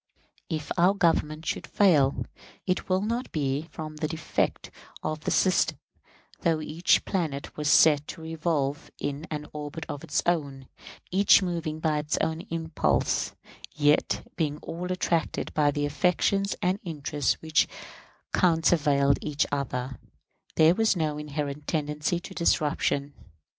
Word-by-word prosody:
If 155 -3 -4
our 185 +3 +5
Government 160 -4 +1
should - - -3
fail, 150 -9 +3 0.4
it 185 0 -1
will 185 +1 +2
not 235 +4 -2
be 145 +1 -1
from 155 -1 -7
the 155 - -1
defect 160 +1 -2 0.3
of 155 0 -3
the - - +1
system, 185 -1 +2 0.6
though 165 -2 +1
each 155 +3 +2
planet 155 -7 -3
was 150 -1 -1
set 150 -1 +5
to - - -8
revolve 155 -3 -2
in 145 +4 -4
an 150 -1 -4
orbit 150 +2 -6
of 145 -2 -6
its - - -1
own, 140 -6 -1 0.4
each 195 +1 +5
moving 165 -3 -3
by 155 -2 +1
its 150 +1 -1
own 160 +1 -1
impulse, 165 -1 0 0.4
yet 145 0 +2
being 150 -3 -1
all 180 +2 -5
attracted 170 -3 -1
by 150 -1 +3
the 145 0 -1
affections 180 +6 +1
and 185 +2 +1
interests 150 -5 -1
which 160 -1 +2 0.7
countervailed 155 -5 +3
each 150 0 0
other; 130 -2 -3 0.6
there 160 +1 +6
was 220 +1 +2
no 155 -3 -1
inherent 150 -1 -4
tendency 150 +2 -1
to - - -9
disruption. 145 -3 +1
155 Hz, 135 wpm, -27 LUFS, 145-170 Hz, 0.7 s, there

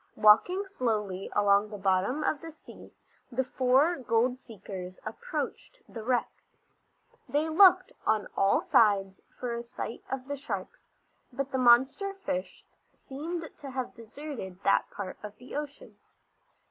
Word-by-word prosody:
Walking 360 - +5
slowly 215 - -2
along 205 +1 +4
the 210 - -7
bottom 195 +9 +1
of 300 - 0
the 330 0 -8
sea 315 - -14 0.4
the 255 +2 0
four 265 +6 +3
gold 245 +1 +1
seekers 190 -6 -9
approached - - -5
the 225 - -8
wreck. 245 +1 +1 1.0
They 300 +3 +1
looked 370 +2 +6
on 215 -2 +1
all 195 0 +3
sides 195 -3 +3 0.2
for 245 -2 -3
a 235 - -3
sight 235 -1 -7
of 265 -1 -4
the 285 0 -3
sharks, 275 - -6 0.4
but 270 +2 -4
the 260 - 0
monster 265 +11 +4
fish 285 -8 -5 0.3
seemed 325 +5 -6
to 280 - -8
have 255 -1 -4
deserted 230 -5 -8
that 200 - +3
part 195 -2 -6
of 210 -1 -8
the 250 - -10
ocean. 290 -1 -7
250 Hz, 140 wpm, -29 LUFS, 210-290 Hz, 1.0 s, looked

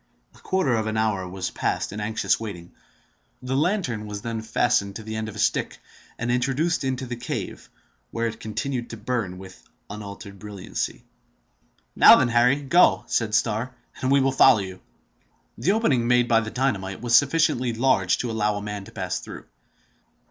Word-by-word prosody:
A - - -19
quarter 185 -9 0
of 110 -1 0
an 110 0 -2
hour 100 -4 0
was 95 0 -4
passed - - -2
in 105 - -5
anxious 110 +1 0
waiting. 90 -6 -7 0.7
The 130 +1 -2
lantern 140 - 0
was 105 -1 -6
then 115 -1 -3
fastened 110 -3 +1
to 110 - -7
the 110 0 -6
end 110 0 -3
of 105 - -10
a - - -9
stick, - - 0 0.4
and 120 +1 -2
introduced 135 +7 0
into 130 -1 -2
the 120 0 -5
cave, 120 +1 -6 0.4
where 115 0 -2
it 110 -1 -4
continued 120 +3 -4
to 115 - -7
burn 110 -5 -3
with 95 0 -12 0.3
unaltered 100 -1 -9
brilliancy. 100 -2 -5 0.9
"Now - - +9
then, 125 - +2
Harry, 125 +5 +3
go," 175 +7 +4
said 110 -2 0
Starr, 115 +3 0 0.3
"and 130 - 0
we 140 0 +5
will 135 0 +2
follow 130 -2 +6
you." 95 -1 -8 0.8
The 195 - +2
opening 140 - +1
made 125 0 +3
by 115 -2 +4
the 110 -1 -4
dynamite 105 -7 -2
was 120 -1 -2
sufficiently 140 -2 +3
large 115 -6 +2
to 120 - -3
allow 105 -1 0
a 105 - -4
man 105 -1 -5
to 115 - -13
pass 95 -4 -3
through. - - -10
115 Hz, 180 wpm, -24 LUFS, 105-125 Hz, 0.9 s, Now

